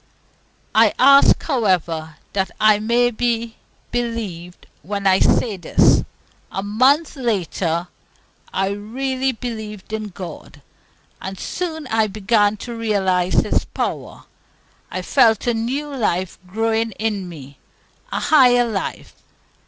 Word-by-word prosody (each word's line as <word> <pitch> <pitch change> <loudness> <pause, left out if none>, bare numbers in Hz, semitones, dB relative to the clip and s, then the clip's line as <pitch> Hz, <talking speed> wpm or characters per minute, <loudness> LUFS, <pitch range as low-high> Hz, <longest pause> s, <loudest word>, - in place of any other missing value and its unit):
I 220 -1 +4
ask, 275 +1 +6
however, 175 - 0 0.2
that 190 -1 0
I 215 -1 +5
may 240 +3 +2
be 230 -1 -2 0.3
believed 215 -8 -4 0.2
when 200 +5 -4
I 190 -1 +5
say 215 -5 +2
this: 175 - +3 0.5
a 195 - -3
month 260 +11 +2
later 180 - -1 0.6
I 195 0 0
really 260 +6 -2
believed 220 -4 -7
in 215 -1 -3
God, 175 -6 -10 0.6
and 190 -1 -6
soon 320 -4 -4
I 220 -3 +1
began 210 +1 +1
to 240 -1 -6
realize 190 -5 0
His - - 0
power. - - -4 0.7
I - - -4
felt 230 -5 +3
a 240 - +2
new 270 +6 -3
life 185 -7 -1
growing 225 +2 -1
in 205 -4 -3
me, 140 -4 -12 0.5
a - - -1
higher 250 -5 +5
life. 210 -4 -4
215 Hz, 120 wpm, -20 LUFS, 190-240 Hz, 0.7 s, ask